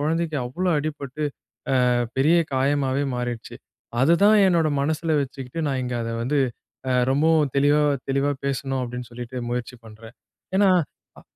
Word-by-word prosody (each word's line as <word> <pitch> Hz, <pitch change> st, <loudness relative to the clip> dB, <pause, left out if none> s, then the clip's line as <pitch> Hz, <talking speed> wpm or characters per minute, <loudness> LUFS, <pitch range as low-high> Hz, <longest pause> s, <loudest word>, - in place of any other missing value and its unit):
கொழந்தைக்கு 160 Hz, +1 st, -1 dB
அவ்வளோ 180 Hz, +9 st, -2 dB
அடிபட்டு, 145 Hz, -1 st, -5 dB, 0.7 s
அ -, -, +3 dB, 0.3 s
பெரிய 155 Hz, +5 st, +4 dB, 0.2 s
காயமாவே 135 Hz, 0 st, +1 dB
மாறிடுச்சு. 120 Hz, -2 st, -5 dB, 0.5 s
அதுதான் 200 Hz, +9 st, +5 dB
என்னோட 170 Hz, -4 st, +3 dB
மனசுல 160 Hz, +2 st, 0 dB
வச்சுக்கிட்டு, 135 Hz, +2 st, -6 dB
நான் 135 Hz, -2 st, -1 dB
இங்க 125 Hz, -, -3 dB
அத 115 Hz, -, -3 dB
வந்து, 140 Hz, +5 st, 0 dB, 0.5 s
அ -, -, +2 dB, 0.2 s
ரொம்பவும் 155 Hz, 0 st, +3 dB
தெளிவா 145 Hz, +2 st, +4 dB, 0.3 s
தெளிவா 140 Hz, +1 st, +1 dB
பேசணும், 135 Hz, -1 st, -2 dB
அப்படின்னு 125 Hz, 0 st, -6 dB
சொல்லிட்டு, 120 Hz, +1 st, -8 dB
முயற்சி 125 Hz, +1 st, -4 dB
பண்றேன். 110 Hz, +2 st, -13 dB, 0.4 s
ஏன்னா, 200 Hz, -1 st, +5 dB, 0.5 s
அ -, -, -19 dB
140 Hz, 135 wpm, -23 LUFS, 125-155 Hz, 0.7 s, அதுதான்